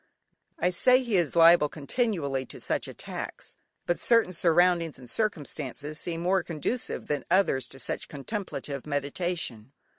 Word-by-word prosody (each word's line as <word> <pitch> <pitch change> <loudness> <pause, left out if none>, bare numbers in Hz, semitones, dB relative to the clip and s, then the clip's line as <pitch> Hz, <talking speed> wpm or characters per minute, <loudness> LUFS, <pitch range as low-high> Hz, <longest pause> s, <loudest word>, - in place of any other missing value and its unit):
I 180 +2 +1
say 255 +8 +4
he 235 -4 -1
is 170 -5 +1
liable 165 -2 +7
continually 150 - -1
to - - -9
such - - -2
attacks, - - -7 0.3
but 175 - 0
certain 230 -6 +3
surroundings, 170 -1 +3
and 125 -1 -12
circumstances 150 - -3
seem 165 -1 -3
more 185 +2 +2
conducive 175 +11 -3
than 145 -1 -2
others 135 -10 +3
to 135 - -11
such 130 - -4
contemplative 145 - -5
meditation. 145 -4 -3
165 Hz, 140 wpm, -28 LUFS, 140-185 Hz, 0.3 s, liable